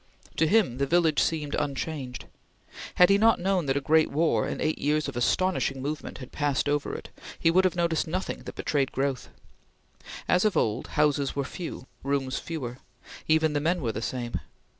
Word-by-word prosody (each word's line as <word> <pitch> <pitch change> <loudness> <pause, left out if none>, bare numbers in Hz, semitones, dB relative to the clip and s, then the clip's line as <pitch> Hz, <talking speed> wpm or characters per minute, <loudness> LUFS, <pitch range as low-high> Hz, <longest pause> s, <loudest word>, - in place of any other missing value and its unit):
To 160 - +3
him 185 - +2
the 140 - +1
village 165 -1 +3
seemed 150 -3 -1
unchanged. 140 -2 -3 0.7
Had 180 +2 +6
he 200 - +5
not 225 +1 +5
known 185 -3 0
that 135 +1 +1
a - - +2
great 155 +3 +3
war 160 +3 +1
and - - -4
eight 155 - 0
years 150 +1 +1
of - - -6
astonishing 140 +2 +1
movement 145 +3 -4
had 130 - -10
passed 145 -2 0
over 145 0 0
it, - - -8 0.3
he 165 - +3
would 185 +2 +4
have 185 - +1
noticed 170 -2 0
nothing 185 +4 -3
that - - -7
betrayed 140 -3 0
growth. 135 -1 -2 1.0
As 180 - +3
of 215 -2 +2
old, 105 -1 0
houses 145 -2 +2
were 140 - 0
few; 165 -4 -7 0.2
rooms 135 -1 -1
fewer; 130 -7 -5 0.5
even 160 -1 +3
the 145 - +1
men 170 +4 +1
were 120 -7 -1
the 110 - -5
same. 120 0 -3
150 Hz, 185 wpm, -27 LUFS, 135-170 Hz, 1.0 s, Had